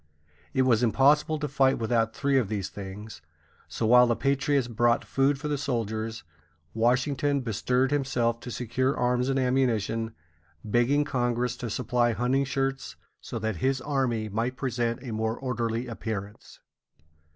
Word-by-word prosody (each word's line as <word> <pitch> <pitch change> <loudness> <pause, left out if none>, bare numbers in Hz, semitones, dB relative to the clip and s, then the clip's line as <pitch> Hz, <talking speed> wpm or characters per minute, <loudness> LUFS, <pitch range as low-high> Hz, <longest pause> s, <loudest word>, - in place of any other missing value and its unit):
It 130 - +2
was 120 -3 +3
impossible 145 +6 +3
to 150 0 -3
fight 135 -1 +2
without 115 -1 0
three 140 -1 +2
of 110 -6 -2
these 100 -4 -3
things; 100 -1 -9 0.5
so 115 - -3
while 125 +2 +7
the 120 - +2
patriots 135 -1 +1
brought 120 0 +1
food 135 +1 +1
for 150 +2 -5
the 145 -2 -1
soldiers, 115 -4 -3 0.5
Washington 130 +4 +1
bestirred 125 +3 0
himself 125 -5 0
to 125 - -8
secure 125 +3 -1
arms 125 +1 +1
and 135 - +1
ammunition, 115 -4 0 0.5
begging 120 +7 +2
Congress 125 -3 -1
to 120 - -5
supply 120 +1 +1
hunting 130 +4 +1
shirts, 135 0 -2 0.3
so - - -6
that 110 -3 -2
his 130 +7 0
army 130 -7 -1
might 115 +5 -2
present 120 -2 -2
a 120 -4 -5
more 110 +1 -1
orderly 120 -2 -2
appearance. 105 -3 -6
125 Hz, 150 wpm, -27 LUFS, 115-135 Hz, 0.5 s, while